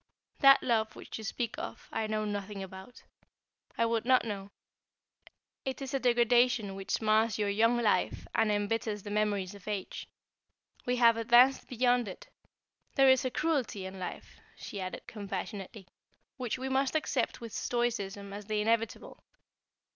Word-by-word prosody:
That 275 0 +7
love 220 -3 +1
which - - -8
you - - -7
speak 230 +1 -3
of, - - -7
I 220 - -1
know 215 0 -1
nothing 205 -1 -4
about. 190 +6 -11 0.7
I 230 - +3
would 230 -1 0
not 255 0 +4
know. 200 -3 -5 1.1
It 265 -1 -4
is 270 0 -6
a 270 - +1
degradation 240 -3 +3
which 195 +3 -3
mars 215 0 +3
your 205 -1 0
young 225 +4 +3
life 215 -6 +1
and 215 - +2
embitters 210 0 -1
the 205 - -7
memories 205 -2 0
of 200 -1 -14
age. 205 -3 -4 0.8
We 250 - +2
have 235 -2 +5
advanced 240 +3 +5
beyond 245 -1 +2
it. 185 - -9 0.7
There 270 -1 +7
is 260 0 +3
a - - +1
cruelty 260 -10 -1
in 190 0 -7
life," 180 - -7 0.2
she 200 - -7
added, 185 0 -5
compassionately, 200 -1 -6 0.5
"which 250 -4 -3
we 260 +1 -4
must 265 +2 +1
accept 315 - 0
with 230 -3 -8
stoicism 205 -5 -2
as 205 0 -7
the 215 -1 0
inevitable. 225 +1 -1
220 Hz, 155 wpm, -31 LUFS, 205-245 Hz, 1.1 s, That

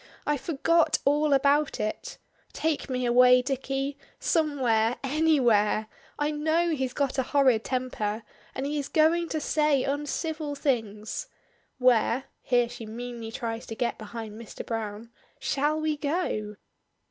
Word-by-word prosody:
I 295 - +2
forgot 330 +3 +2
all 295 +2 +3
about 280 +2 +3
it. 215 - -4 0.4
Take 315 -3 -1
me 255 -1 -1
away, 250 +1 +6
Dicky; 270 +1 -2 0.2
somewhere, 250 -8 +1
anywhere; 260 -8 +3 0.3
I 295 +1 0
know 315 +3 +1
he's 265 -5 -1
got 275 -1 -1
a - - +5
horrid 260 -4 +3
temper, 230 -4 -2 0.3
and 265 - -3
he 295 +1 -1
is 280 - -3
going 330 +2 +3
to 315 - -1
say 300 -2 +2
uncivil 295 +1 -2
things. 225 - -2 0.5
Where" 250 0 +3 0.2
(here 245 -2 +2
she 240 -2 -9
meanly 235 0 -6
tries 230 0 -4
to 225 - -6
get 240 +1 -2
behind 220 0 -7
Mr. 230 - -8
Browne) 225 0 -5 0.3
"shall 295 +3 0
we 310 -1 -1
go." 285 -9 -2
270 Hz, 135 wpm, -27 LUFS, 230-300 Hz, 0.5 s, away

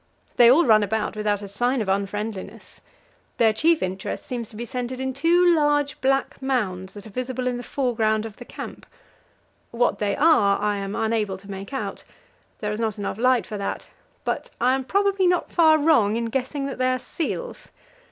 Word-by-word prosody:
They 235 -1 +8
all 305 +8 +6
run 215 -3 +6
about 215 +2 -1
without 210 -1 -1
a - - -6
sign 245 +6 0
of 215 - -2
unfriendliness. 200 +1 -4 0.6
Their 225 -2 +4
chief 320 +8 +2
interest 190 +1 -4
seems 240 -3 -5
to - - -12
be 235 +3 -5
centred 250 +1 -4
in 265 0 -2
two 335 +6 +3
large 295 -2 +1
black 270 +1 0
mounds 195 -8 -2
that 205 - -10
are 215 - -11
visible 255 +3 -3
in 250 -1 -1
the - - -5
foreground 225 -5 0
of 220 -2 -9
the 245 - -9
camp; - - -9 0.8
what 240 +1 0
they 205 -1 0
are 275 -11 +4
I 210 -1 0
am 195 0 -4
unable 220 -3 -1
to 200 +1 -11
make 195 +3 -7
out 270 - -4 0.6
there 210 -1 -2
is 210 - -4
not 220 -2 -1
light 200 -1 -4 0.2
enough - - -15
for 210 - -6
that 200 - -4 0.3
but - - -3
I 250 +2 +3
am 265 -1 -1
probably 395 +2 +2
not 355 -1 +1
far 315 -2 +5
wrong 285 -9 +3
in 230 0 -1
guessing 270 +2 -2
that 275 -2 -5
they 255 0 +2
are 255 - +1
seals. 340 - -5
235 Hz, 195 wpm, -24 LUFS, 210-270 Hz, 0.8 s, They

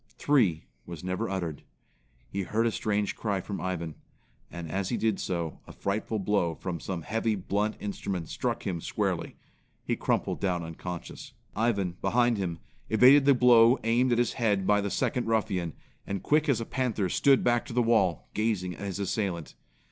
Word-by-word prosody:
"Three" 110 - +2 0.2
was 85 -2 -8
never 90 0 -2
uttered. 85 -6 -3 0.7
He 100 - -3
heard 110 +5 0
a 115 - +2
strange 105 -2 -1
cry 100 -3 -1
from 100 +2 -5
Ivan; 85 -3 -3 0.6
and 85 -2 -7
as 95 0 -1
he 120 - 0
did 110 -3 0
so, 85 -3 -3
a - - -9
frightful 105 +2 -2
blow 95 -5 0
from 90 -1 -4
some 90 -2 -4
heavy, 115 +2 0
blunt 105 +2 -1
instrument 95 -4 -4
struck - - -3
him 85 -4 -2
squarely. - - -2 0.5
He - - 0
crumpled - - -1
down 90 -3 0
unconscious. 85 +1 -7 0.2
Ivan, 100 -6 0
behind 120 +2 +2
him, 85 -4 -2 0.3
evaded 130 +5 +7
the 140 -1 +6
blow 120 0 +6
aimed 120 +3 +2
at 120 - +3
his 120 0 +1
head 105 -5 +1
by 105 +1 +3
the 100 - -2
second 125 +4 -1
ruffian, 95 -7 0 0.3
and 100 -1 -3
quick 150 0 +2
as 125 -5 +3
a 115 - -3
panther 115 -7 -1
stood 135 +9 +3
back 120 -1 +2
to - - -7
the 120 0 +3
wall, 100 -8 +2
gazing 105 -5 -1
at 100 - -6
his 95 - -4
assailant. 95 -4 -2
100 Hz, 180 wpm, -28 LUFS, 90-115 Hz, 0.7 s, evaded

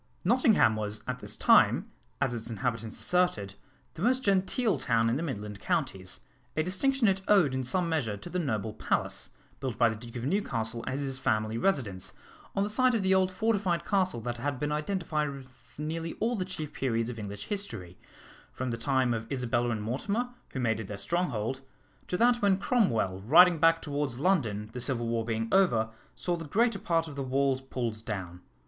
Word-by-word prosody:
Nottingham 220 - +4
was 105 0 -3
at 125 0 -3
this - - -5
time, - - +4 0.3
as 135 -3 +1
its 115 0 -4
inhabitants 115 -1 -3
asserted, 180 - +1 0.4
the 165 - -9
most 255 +5 +2
genteel 195 - +2
town 115 -1 +2
in - - +1
the 145 - -1
midland 105 -10 -4
counties, 95 -2 -2 0.4
a 155 - +3
distinction 235 - +2
it 195 0 +2
owed 185 -10 +5
in 130 0 -1
some 175 +8 0
measure 130 -11 -1
to 100 - -9
the 180 - -2
noble 110 - -2
palace, 110 - -1 0.3
built 130 -5 -3
by 115 - +5
the 110 - -3
Duke 115 +2 -10
of 120 0 -4
Newcastle 120 - -1
as 130 +2 -2
his 135 -1 -2
family 110 -3 0
residence, 115 - -1 0.4
on 195 - +2
the 205 - -1
site 255 +2 +3
of 215 - 0
the 190 0 +3
old 190 0 +3
fortified 195 -4 0
castle 185 - +1
that 120 +1 -3
had 135 +2 -2
been 150 +1 -1
identified 150 -1 -1
with 130 -2 -12
nearly 165 +2 -3
all 235 +2 -1
the 185 -4 -2
chief 160 -5 -6
periods 115 -2 -1
of 115 - -8
English 105 0 -6
history, 195 - -5 0.5
from 130 -1 -3
the 115 - -2
time 130 0 +1
of 115 0 -5
Isabella 120 -2 0
and 110 -3 -2
Mortimer, 200 - -1 0.2
who 130 - -5
made 115 -3 +1
it 110 - -5
their 100 - -6
stronghold, 130 - -1 0.5
to 180 - -1
that 240 +3 +4
when 200 -2 +4
Cromwell, 120 - +1
riding 170 - +6
back 165 +1 +4
towards 145 -4 -2
London, 115 - 0
the 125 - -5
Civil 120 -2 0
War 115 0 0
being 115 0 -2
over, 115 -13 +3 0.2
saw 175 - -1
the 165 -1 -6
greater 225 +7 +2
part 165 -2 0
of 145 - -8
the 140 - -3
walls 135 0 +1
pulled 120 -4 -4
down. 90 -5 -5
135 Hz, 195 wpm, -29 LUFS, 115-180 Hz, 0.5 s, riding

